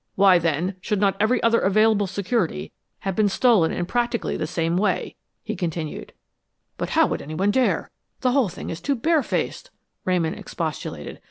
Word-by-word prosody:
"Why, 190 -2 +6
then, 170 +3 -1
should 210 +1 -1
not 195 -1 +2
every 220 +3 +2
other 230 0 +4
available 210 +1 +3
security 190 -1 -1 0.3
have 195 -2 -2
been 210 0 +3
stolen 200 -6 +3
in 175 - -2
practically 240 +3 -1
the - - -2
same 165 0 -1
way?" 185 -1 0 0.3
he 220 -1 -4
continued. 165 -4 -4 0.7
"But - - -2
how - - +7
would - - -2
anyone 160 +7 0
dare? 255 +3 +1 0.3
The 255 - +2
whole 255 -6 +2
thing - - -7
is 165 +1 -6
too 280 - 0
bare 315 +6 +2
faced," - - -3 0.3
Ramon 175 -4 +1
expostulated. 150 - -5
195 Hz, 170 wpm, -23 LUFS, 170-230 Hz, 0.7 s, how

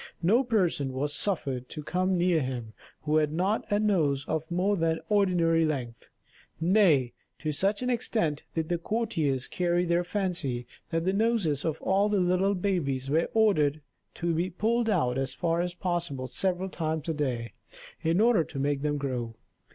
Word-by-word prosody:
No 225 +10 +4
person 180 - 0
was 145 +3 -1
suffered 135 -10 -1
to 150 - -7
come 185 +3 0
near 175 -2 +2
him 120 -4 -4 0.3
who 155 +1 +1
had 150 -1 +2
not 190 +8 -1
a 205 - +3
nose 155 -10 +1
of 160 0 -3
more 185 +4 +1
than 165 -2 0
ordinary 175 -5 +3
length; 130 -7 -3 0.5
nay, 165 - +3 0.2
to 155 - -2
such 200 - 0
an 250 - 0
extent 220 -10 0
did 160 -1 -1
the 175 -1 0
courtiers 165 - -1
carry 175 0 0
their 170 +1 +2
fancy, 175 -10 -2 0.2
that 165 0 -1
the 190 - +2
noses 200 - +1
of 160 -1 -2
all 200 +2 +2
the 205 -1 +2
little 185 +2 +2
babies 140 -9 -1
were 160 +3 +2
ordered 155 -10 +3 0.4
to 170 0 -1
be 170 +3 0
pulled 225 +6 0
out 135 -11 +1
as 135 0 -3
far 170 -1 0
as 175 0 -3
possible 170 -8 -2
several 185 +6 -1
times 160 -3 -3
a 165 - 0
day, 125 -7 -2 0.5
in 165 +3 +1
order 225 -6 +4
to 155 - -10
make 140 0 0
them 145 0 0
grow. 125 -5 -3
165 Hz, 175 wpm, -28 LUFS, 145-190 Hz, 0.5 s, No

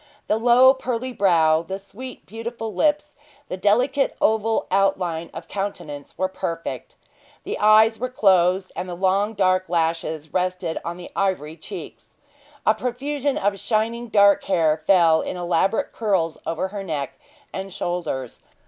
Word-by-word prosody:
The 215 - 0
low, 245 +3 +6
pearly 255 -1 -4
brow, 165 -6 +3
the 190 +3 -5
sweet, 240 +6 -10
beautiful 225 +1 -6
lips, 295 -1 +1 0.4
the - - -3
delicate 245 +9 +1
oval 220 0 +1
outline 180 -4 0
of 165 +1 -9
countenance, 175 -8 -6
were 185 - +1
perfect. 165 -3 -5 0.5
The - - -4
eyes 215 +1 +5
were 255 +2 -2
closed, 185 -5 +3
and 180 +1 -4
the 175 - -5
long 195 +4 +1
dark 185 -2 +1
lashes 160 -2 -1
rested 180 -2 -1
on 170 +1 -5
the 180 - -10
ivory 180 -6 -1
cheeks. - - -10 0.5
A 215 - +5
profusion 270 +5 -2
of 200 0 0
shining 230 +2 -1
dark 200 -2 +4
hair 160 -4 +2
fell 170 -4 +5
in - - -5
elaborate 180 - 0
curls 190 -8 -1
over 165 +3 -2
her 200 0 -6
neck 150 -7 -4 0.4
and 195 0 -5
shoulders. 175 -9 -4
195 Hz, 145 wpm, -23 LUFS, 170-225 Hz, 0.5 s, low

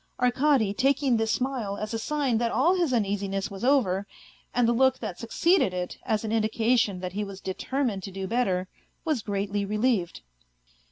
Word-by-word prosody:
Arkady, 250 -3 +3
taking 265 +1 +2
this 225 0 0
smile 240 -5 -1
as 215 +2 -4
a 225 - -1
sign 275 -3 0
that 235 -1 0
all 330 +8 +3
his 345 -6 +1
uneasiness 200 -3 -1
was 195 +2 -8
over, 210 -8 +2 0.4
and 245 -1 +2
the 235 - +3
look 260 +2 +3
that 215 -6 -6
succeeded 230 - +2
it 180 0 -4
as 215 0 +1
an 215 - -3
in 225 0 +2
dication 220 -2 +1
that 180 -1 -4
he 210 +2 -2
was 195 -1 -8
determined 210 +3 -2
to 195 - -7
do 190 0 -5
better, 190 -5 0 0.4
was 305 -7 0
greatly 200 0 -2
relieved. 210 - 0
225 Hz, 180 wpm, -27 LUFS, 195-255 Hz, 0.4 s, Arkady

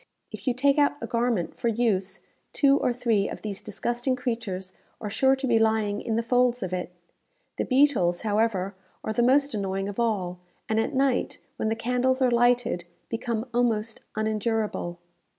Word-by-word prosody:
If - - -9
you 250 - +2
take 280 +3 +3
out 285 0 +4
a - - -4
garment 235 -6 -1
for - - 0
use, 200 -5 0 0.3
two 275 -1 +5
or - - +1
three 230 -5 +1
of - - -8
these 205 -2 -4
disgusting 240 +5 -1
creatures 225 -7 -4 0.3
are 210 -2 -5
sure 265 +5 +4
to 265 0 -4
be 235 -3 +3
lying 220 -2 +1
in 225 - -2
the 230 - +1
folds 245 0 +2
of 185 -1 -4
it. 180 -1 -2 0.7
The - - 0
beetles, 255 -11 +3
however, 205 -3 0 0.3
are 220 - -2
the 240 - +1
most 275 +3 +4
annoying 195 -1 -2
of 205 +2 -5
all; 190 -6 -1 0.3
and 220 0 +1
at 225 - -1
night, 265 -1 +1 0.2
when 220 - 0
the 225 - 0
candles 250 +3 +1
are 255 -2 +3
lighted, 240 -6 +2 0.2
become 230 0 -2
almost 230 -2 +1 0.2
unendurable. 215 -4 -1
230 Hz, 175 wpm, -26 LUFS, 205-245 Hz, 0.7 s, two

